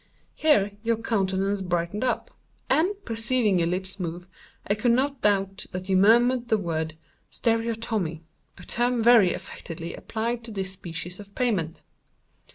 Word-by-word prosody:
Here 280 -11 +3
your 230 0 +1
countenance 195 -3 0
brightened 175 +3 -1
up, 255 - -1 0.4
and, 365 +6 +3
perceiving 225 -3 +1
your 165 - +2
lips 185 +2 -3
move, 175 0 -5 0.4
I 205 - +2
could 230 +3 +2
not 275 +2 0
doubt 195 -1 +1
that 185 +1 -5
you 190 - +3
murmured 240 +5 +5
the 220 - +3
word 160 -4 -3 0.3
'stereotomy,' 225 -7 -1 0.3
a 180 - -11
term 240 +3 0
very 225 -6 +7
affectedly 165 0 -7
applied 235 +1 -3
to 230 - -7
this 190 -2 -3
species 180 -1 -6
of 200 0 -12
pavement. 195 -11 -1
205 Hz, 145 wpm, -26 LUFS, 180-235 Hz, 0.4 s, very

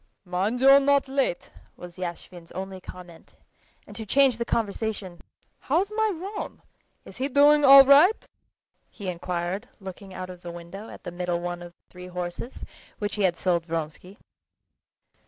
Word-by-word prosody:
"Mind 195 +7 -1
you're 275 +1 +8
not 280 0 +2
late!" 265 -9 -1 0.3
was 175 0 -11
Yashvin's 175 -1 -7
only 190 0 -6
comment; 180 -2 -13 0.5
and - - -13
to 225 - -6
change 265 +2 +3
the 235 - -1
conversation: 210 -5 -3 0.4
"How's 355 +9 0
my 440 -1 +2
roan? 390 +5 -7 0.4
is - - -13
he 260 +2 -1
doing 290 +2 +5
all 275 0 +10
right?" 295 +10 +5 0.6
he 200 -4 -7
inquired, 180 +5 -4
looking 190 0 -10
out 185 0 -7
of 180 -1 -13
the 175 - -8
window 175 +5 -10
at - - -12
the - - -6
middle 175 0 -2
one 175 0 -5
of 175 0 -10
the - - -39
three 180 0 -10
horses, 180 +6 -6 0.3
which 205 0 -3
he 210 - -2
had 180 -3 +2
sold 170 -2 0
Vronsky. 165 +4 -5
190 Hz, 160 wpm, -25 LUFS, 175-270 Hz, 0.6 s, all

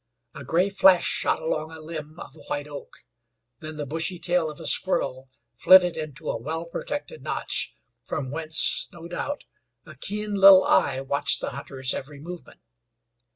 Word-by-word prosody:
A 145 -3 -9
gray 180 +9 +1
flash 190 -2 +5
shot - - 0
along 160 0 -3
a 160 - -10
limb 155 0 -8
of 135 - -10
a - - -16
white 145 0 -3
oak; 145 -1 -10 0.6
then 155 0 -7
the 150 - -4
bushy 165 +5 -3
tail 175 -2 0
of 150 - -10
a - - -9
squirrel 135 -8 0 0.3
flitted 180 +4 +6
into 155 -4 -7
a - - -3
well 160 +6 -4
protected 290 - -6
notch, - - -2 0.3
from 135 -4 -4
whence, 155 +1 +2
no 170 -1 -11
doubt, 285 +11 -4 0.4
a - - -11
keen 210 +1 -4
little 195 -1 +8
eye 130 - +2
watched 140 +1 +1
the - - -4
hunter's 130 -2 -2
every 140 +1 -7
movement. 175 +3 -10
160 Hz, 165 wpm, -25 LUFS, 145-180 Hz, 0.6 s, little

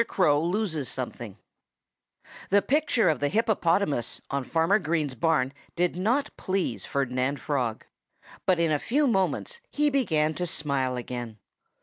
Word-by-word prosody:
CROW 150 -6 +3
LOSES 170 - -1
SOMETHING 120 -5 -5 1.1
The 200 +1 +4
picture 280 -7 +2
of 155 -5 +2
the 145 - +1
hippopotamus 190 - +1
on 140 -1 -1
Farmer 165 - +2
Green's 155 -5 -1
barn 135 0 +1 0.2
did 175 0 +1
not 235 +10 0
please 190 -1 -2
Ferdinand 135 0 -1
Frog. 125 -6 -2 0.6
But 185 -2 +3
in 165 -2 +2
a 150 - +2
few 290 - +1
moments 235 - 0
he 295 0 +1
began 160 - +1
to 180 +2 -3
smile 140 -5 -1
again. 120 -2 -5
160 Hz, 135 wpm, -27 LUFS, 135-200 Hz, 1.1 s, The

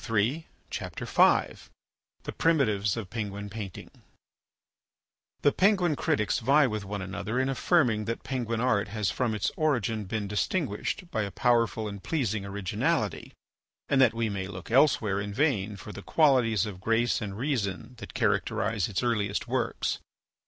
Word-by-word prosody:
THE 115 +9 +1 0.8
ARTS: - - +3 0.5
THE - - -4
PRIMITIVES 110 -11 +2
OF 105 -5 -5
PENGUIN 100 -2 -4
PAINTING 100 -4 -7 1.5
The 145 - +5
Penguin 185 -4 +3
critics 110 -5 0
vie 140 +5 +4
with 110 -4 -2
one 100 0 -4
another 100 +5 -3
in 130 - +1
affirming 130 -7 +2
that 115 +2 -4
Penguin 120 -4 -2
art 115 -5 +2
has 105 -1 -1
from 120 -4 -1
its 105 - -1
origin 120 -8 0
been 105 +1 -3
distinguished 140 - -2
by 110 - 0
a 100 - -2
powerful 115 +1 +1
and 100 -1 -7
pleasing 110 -10 -1
originality, 100 -2 -1 0.5
and 135 -1 +3
that 115 -3 +5
we 115 0 0
may 100 -2 -3
look 95 +1 -9
elsewhere 115 -7 +3
in 100 0 -5
vain 110 -8 +1
for 105 - -9
the 100 - -8
qualities 125 - +3
of 95 -3 -7
grace 115 0 +1
and 100 -2 -5
reason 120 -4 -2
that - - -10
characterise 110 -4 0
its 100 +3 -2
earliest 105 -4 0
works. 120 -1 -1
110 Hz, 150 wpm, -28 LUFS, 100-130 Hz, 1.5 s, The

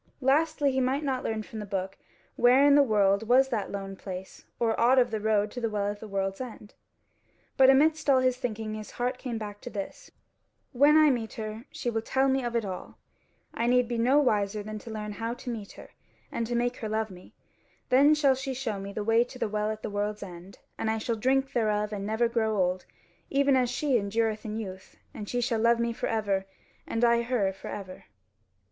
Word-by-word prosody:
Lastly, 290 +2 +2
he 260 0 0
might 265 +4 0
not 265 -3 -1
learn 220 -1 -2
from 220 +1 -8
the 210 - -5
book 195 -1 -3 0.4
where 250 +3 +5
in 285 - +6
the 285 - +7
world 210 -4 +2
was 265 +3 +5
that 220 -6 -2
lone 195 -1 -5
place, 190 -1 -8
or 230 -1 +2
aught 250 +3 +5
of 245 -2 +4
the 220 - -1
road 210 -1 +1
to 245 - -6
the 230 - 0
Well 205 -1 -1
at 205 - -9
the 220 - -8
World's 195 +1 -2
End. 225 -4 -9 0.8
But 265 0 +6
amidst 305 +3 +4
all 270 - +6
his 255 -1 +2
thinking 220 -4 -4
his 215 -1 -7
heart 250 +1 -1
came 240 -3 -4
back 205 -2 -7
to - - -7
this: 200 -4 -7 0.6
"When 290 +4 +5
I 305 -2 +6
meet 230 -3 -3
her, 220 +2 -6
she 240 - -3
will 225 -1 -1
tell 265 +4 +1
me 265 0 +1
of 240 -1 -3
it 230 -2 +1
all; 185 -2 -7 0.6
I 235 - -1
need 250 0 +3
be 240 -1 -2
no 255 +5 +4
wiser 210 -6 +1
than 215 0 -6
to 230 - -11
learn 210 -1 -5
how 230 +3 -4
to 245 - -6
meet 215 -4 -7
her - - -13 0.4
and 230 - -2
to 240 - -2
make 245 +1 0
her 220 - -5
love 220 -1 -1
me; 180 0 -14 0.5
then 285 +4 +6
shall 285 -3 +4
she 265 0 -4
show 235 -6 -3
me 195 +1 -6
the 210 - -4
way 225 +2 +4
to 255 - -12
the 250 - -1
Well 210 0 -1
at 215 0 -5
the - - -3
World's 205 +1 -2
End, 180 0 -11 0.2
and 220 - -1
I 220 - 0
shall 225 +1 -2
drink 265 +4 +1
thereof 210 -2 0
and 200 -1 -4
never 220 +2 +1
grow 220 -2 0
old, 180 -1 0 0.4
even 280 0 +3
as 250 -2 +2
she 260 +1 +1
endureth 220 +1 -1
in 215 0 -4
youth, 190 -4 -8 0.2
and 210 -2 -7
she 245 - -1
shall 235 -2 0
love 235 +1 +3
me 235 0 0
for - - -3
ever, 200 -3 -1 0.4
and 230 +1 +1
I 235 0 +4
her 230 -5 0
for 190 - -10
ever." 190 -2 -8
225 Hz, 230 wpm, -28 LUFS, 210-255 Hz, 0.8 s, the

